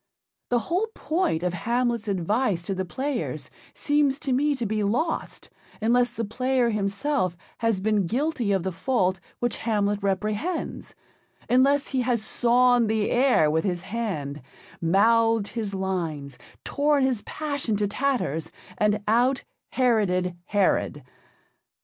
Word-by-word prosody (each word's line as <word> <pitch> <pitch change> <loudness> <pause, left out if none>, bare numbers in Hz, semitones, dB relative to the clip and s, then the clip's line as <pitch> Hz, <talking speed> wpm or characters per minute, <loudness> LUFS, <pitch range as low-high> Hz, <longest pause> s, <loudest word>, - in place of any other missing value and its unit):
The 245 - +3
whole 370 +6 0
point 310 - 0
of 180 -1 0
Hamlet's 235 +3 -1
advice 200 0 0
to 195 - -2
the 190 0 -2
players 260 +7 -3 0.2
seems 290 -2 +2
to 270 - 0
me 290 +3 +2
to 245 -3 -3
be 215 0 -1
lost 250 +12 -2 0.3
unless 240 +2 +3
the 230 -2 -4
Player 255 +2 +1
himself 200 - -1 0.2
has 225 -4 +1
been 205 -2 +1
guilty 255 - 0
of 190 -3 +1
the 190 - -2
fault 185 -2 0 0.2
which 240 -1 -1
Hamlet 205 -2 0
reprehends, 210 - -2 0.5
unless 275 +3 +3
he 260 -2 0
has 240 -3 0
sawn 245 -1 +3
the 215 -1 0
air 245 - +4
with 160 +1 +1
his 180 -3 -2
hand, 160 - -4 0.4
mouthed 225 +5 +3
his 215 -4 -4
lines, 165 -9 -3 0.2
torn 290 -1 +2
his 255 -5 +1
passion 285 -7 -2
to 205 0 0
tatters, 210 - -1 0.3
and 210 0 +2
out 245 +5 +2 0.3
Heroded 195 -8 +1
Herod. 190 -7 +1
225 Hz, 135 wpm, -25 LUFS, 195-255 Hz, 0.5 s, air